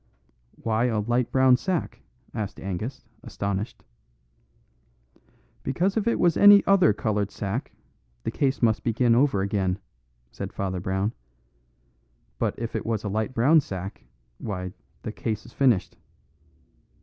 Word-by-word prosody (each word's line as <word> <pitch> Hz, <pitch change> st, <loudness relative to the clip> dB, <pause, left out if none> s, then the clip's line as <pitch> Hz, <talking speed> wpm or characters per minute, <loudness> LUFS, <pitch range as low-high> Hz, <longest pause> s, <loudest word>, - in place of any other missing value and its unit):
"Why 115 Hz, +1 st, 0 dB
a 115 Hz, -4 st, +1 dB
light 120 Hz, +3 st, 0 dB
brown 130 Hz, -1 st, +5 dB
sack?" 180 Hz, +3 st, -2 dB, 0.3 s
asked 105 Hz, -2 st, -4 dB
Angus, 100 Hz, +7 st, -5 dB, 0.2 s
astonished. 100 Hz, +1 st, -4 dB, 1.8 s
"Because 185 Hz, +9 st, 0 dB
if 220 Hz, 0 st, 0 dB
it 235 Hz, -, +2 dB
was 170 Hz, -2 st, +3 dB
any 205 Hz, 0 st, +8 dB
other 195 Hz, -, +5 dB
coloured 105 Hz, -1 st, -1 dB
sack, 105 Hz, +5 st, -4 dB, 0.5 s
the -, -, -2 dB
case 135 Hz, -2 st, 0 dB
must 110 Hz, -2 st, +3 dB
begin 120 Hz, 0 st, +2 dB
over 120 Hz, -6 st, +3 dB
again," 95 Hz, -2 st, 0 dB, 0.5 s
said -, -, -6 dB
Father 95 Hz, -2 st, -2 dB
Brown; 95 Hz, +4 st, -1 dB, 1.3 s
"but -, -, 0 dB
if 115 Hz, -1 st, -4 dB
it -, -, -1 dB
was 110 Hz, -2 st, -2 dB
a 105 Hz, -, -2 dB
light 110 Hz, +5 st, -2 dB
brown 140 Hz, +8 st, +5 dB
sack, 95 Hz, -5 st, -7 dB, 0.4 s
why, 90 Hz, -4 st, -4 dB, 0.3 s
the 110 Hz, -, -4 dB
case 110 Hz, -1 st, -4 dB
is 120 Hz, -, -14 dB
finished." 125 Hz, -9 st, +2 dB
110 Hz, 135 wpm, -26 LUFS, 100-130 Hz, 1.8 s, any